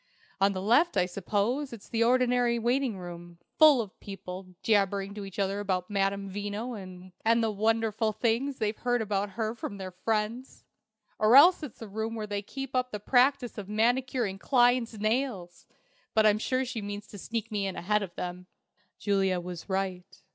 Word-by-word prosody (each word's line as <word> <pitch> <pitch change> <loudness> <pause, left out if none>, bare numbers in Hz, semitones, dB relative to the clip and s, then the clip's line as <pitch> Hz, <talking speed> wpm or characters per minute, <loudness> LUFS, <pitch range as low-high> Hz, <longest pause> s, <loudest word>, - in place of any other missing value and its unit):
On 195 +1 +3
the 185 0 -4
left, 240 - +3
I 180 - +4
suppose, 210 +9 -1
it's 225 -4 -10
the 230 0 +1
ordinary 245 0 +3
waiting 240 -1 0
room, 175 -1 -9 0.2
full 305 -5 +8
of 210 -1 -9
people 185 -2 -8
jabbering 200 -2 +1
to 205 -1 -6
each 195 - -10
other 200 0 0
about 185 -2 -2
Madame 195 0 0
Veno 205 +5 -4 0.5
and 230 +1 +3
the 220 - +1
wonderful 220 +1 +1
things 240 +5 0
they've 215 -1 -2
heard 245 -2 +1
about 200 -1 -2
her 220 -1 -1
from 215 -3 -6
their 190 -1 -6
friends! 220 +6 -3 0.6
Or 215 +3 +5
else 345 +7 +8
it's 270 -6 -8
a - - -7
room 220 +3 -4
where 215 -1 -3
they 205 -1 -3
keep 270 +6 -7
up 255 0 +1
the 210 - -5
practice 250 +2 +3
by 210 - -4
manicuring 230 -1 0
clients' 245 -2 +3
nails. 215 -5 -2 0.5
But 220 -1 +5
I'm 210 0 +4
sure 255 +3 0
she 240 -3 -4
means 205 0 -6
to 205 - -10
sneak 230 +3 -4
me 200 -2 -1
in 190 - -4
ahead 210 +4 +1
of 190 -4 -6
them." 180 0 -6 0.5
Juliet 195 -3 +1
was 175 +1 -8
right. 190 -2 -3
215 Hz, 180 wpm, -29 LUFS, 195-240 Hz, 0.6 s, full